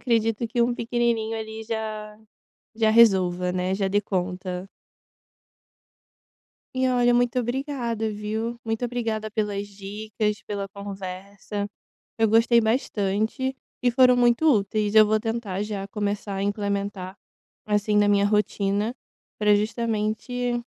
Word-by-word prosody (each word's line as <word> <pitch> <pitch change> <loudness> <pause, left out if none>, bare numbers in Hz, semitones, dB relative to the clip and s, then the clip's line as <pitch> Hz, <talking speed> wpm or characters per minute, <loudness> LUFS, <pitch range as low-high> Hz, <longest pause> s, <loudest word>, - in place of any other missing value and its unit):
acredito 230 -1 +1
que 235 +1 +1
um 240 +1 +1
pequenininho 230 -1 0
ali 220 0 -6
já, 215 -1 -5 0.6
já 220 -1 +3
resolva, 185 -5 +4
né, 185 +1 0
já 195 0 0
dê 205 +2 +2
conta. 185 -1 -3 2.1
E 260 0 +2
olha, 245 -1 +3
muito 245 +1 +2
obrigada 240 -3 -2
viu, 220 +3 -3
muito 225 +1 -2
obrigada 225 -3 -2
pelas 205 -2 -2
dicas, 205 +1 -4
pela 200 -1 -3
conversa, 200 +1 -6 0.5
eu 225 - +4
gostei 230 +2 +5
bastante 220 +2 0 0.3
e 245 - +3
foram 250 0 +5
muito 240 +3 +3
úteis, 210 -2 +1
eu 215 -1 +8
vou 215 +1 +2
tentar 225 -4 -3
já 205 -2 -4
começar 205 -1 -3
a 195 - -2
implementar, 200 -2 -2 0.5
assim, 210 0 +1
na 205 0 +4
minha 200 0 +4
rotina 205 +1 +1 0.5
pra 210 -1 +5
justamente 230 +3 -1
215 Hz, 125 wpm, -25 LUFS, 200-235 Hz, 2.1 s, eu